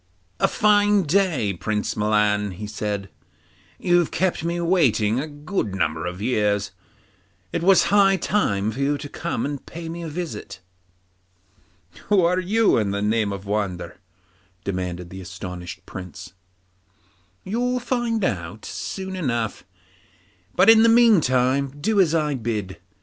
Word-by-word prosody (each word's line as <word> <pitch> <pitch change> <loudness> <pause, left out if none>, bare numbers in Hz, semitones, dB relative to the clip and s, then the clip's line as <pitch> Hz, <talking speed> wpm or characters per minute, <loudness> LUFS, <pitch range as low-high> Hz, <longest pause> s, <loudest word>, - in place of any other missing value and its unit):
'A - - +4
fine 205 -1 +3
day, 155 - +1
Prince 105 +4 -2
Milan,' 105 -1 +1
he 105 +4 -7
said; 105 -1 -4 0.7
'you've 175 -2 +2
kept 185 -3 -1
me 170 +1 -1
waiting 130 - +2
a 150 - -3
good 145 - -3
number 80 -2 -1
of 90 +1 -6
years; 105 -4 0 0.8
it - - -1
was 190 +2 +5
high 195 -1 +5
time 110 - 0
for 130 - -8
you 140 +1 +1
to 145 - -7
come 170 +3 -3
and 145 -1 -4
pay 170 0 -7
me 170 +1 -6
a 165 - -5
visit.' 160 - -6 1.5
'Who 195 -4 +4
are 180 +2 +2
you, 210 - +2
in 105 -2 0
the 100 +1 -2
name 105 -1 +1
of 100 0 -6
wonder?' 100 -4 -3 0.7
demanded 90 -2 -4
the 95 0 -8
astonished 90 -1 -8
Prince. 90 -1 -9 1.1
'You'll 245 +5 -1
find 240 -3 -1
out 90 - -4
soon 190 -1 -5
enough, 120 - -2 0.9
but 185 +2 +4
in 225 0 +8
the 230 - +6
meantime 140 - +4
do 205 +6 +2
as 165 -3 +2
I 150 -2 +1
bid 110 -6 -3
you. - - -10
135 Hz, 145 wpm, -23 LUFS, -, 1.5 s, in